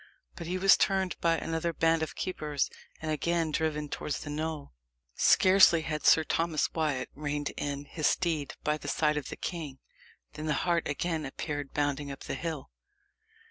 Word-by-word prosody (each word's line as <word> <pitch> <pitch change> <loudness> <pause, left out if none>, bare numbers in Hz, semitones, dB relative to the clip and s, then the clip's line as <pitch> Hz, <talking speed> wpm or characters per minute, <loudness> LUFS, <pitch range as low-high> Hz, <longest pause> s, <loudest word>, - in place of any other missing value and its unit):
But 170 - -7
he 180 +2 -1
was 195 +1 +6
turned 190 -2 +1
by 165 -1 +3
another 165 +1 -2
band 165 0 +2
of 160 - -3
keepers, 150 -6 -2 0.3
and 155 - -1
again 165 +1 0
driven 150 -1 -1
towards 145 0 -4
the 145 - -6
knoll. 155 - -4 0.4
Scarcely 185 -3 +6
had 155 -1 -2
Sir 160 - +7
Thomas 165 0 0
Wyat 150 -5 -1
reined 145 0 -3
in 145 0 -3
his 155 0 -1
steed 160 -6 0
by 150 0 0
the - - -8
side 150 -1 +2
of 150 -3 -3
the - - -5
king, 155 -6 -5 0.6
than 155 - -5
the 150 - +1
hart 170 -2 +1
again 160 +2 -1
appeared 145 +1 -5
bounding 145 -1 -1
up 135 - -8
the - - -5
hill. 160 -4 -5
155 Hz, 175 wpm, -30 LUFS, 145-165 Hz, 0.6 s, Sir